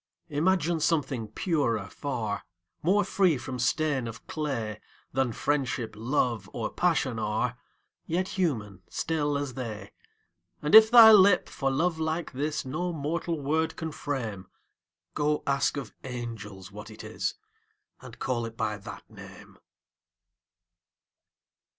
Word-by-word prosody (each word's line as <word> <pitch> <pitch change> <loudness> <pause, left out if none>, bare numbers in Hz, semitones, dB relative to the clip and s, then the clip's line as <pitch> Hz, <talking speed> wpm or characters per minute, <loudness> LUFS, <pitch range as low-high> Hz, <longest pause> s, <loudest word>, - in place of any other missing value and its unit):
Imagine 165 +2 +1
something 145 -8 0
purer 115 - 0
far, 110 -2 -3 0.4
More 200 +5 +3
free 185 -4 +2
from 125 +1 -6
stain 135 0 +1
of 115 0 -9
clay 115 -9 -3 0.3
Than 130 -1 +1
Friendship, 130 -3 -1
Love, 115 -3 0
or 110 -2 -3
Passion 140 -9 +1
are, 110 +3 -1 0.5
Yet 180 +3 0
human, 110 - -2
still 150 -3 -1
as 140 -2 -3
they: 115 -5 -6 0.7
And 150 - -2
if 220 0 +10
thy 230 -2 +10
lip, 200 -3 +6
for 135 - -1
love 160 +5 0
like 160 +1 -2
this, 145 +3 -2
No 165 +7 -2
mortal 165 +1 -2
word 160 +3 0
can 160 -1 -4
frame, 115 -11 -4 0.7
Go, 150 0 0
ask 140 +1 +1
of 135 -6 -6
angels 110 -6 -7
what 105 +2 -9
it 110 0 -10
is, 110 0 -3 0.7
And - - -11
call 120 -3 -1
it 115 0 -11
by 105 -1 -1
that 100 - -10
name! - - -13
140 Hz, 130 wpm, -28 LUFS, 115-160 Hz, 0.7 s, if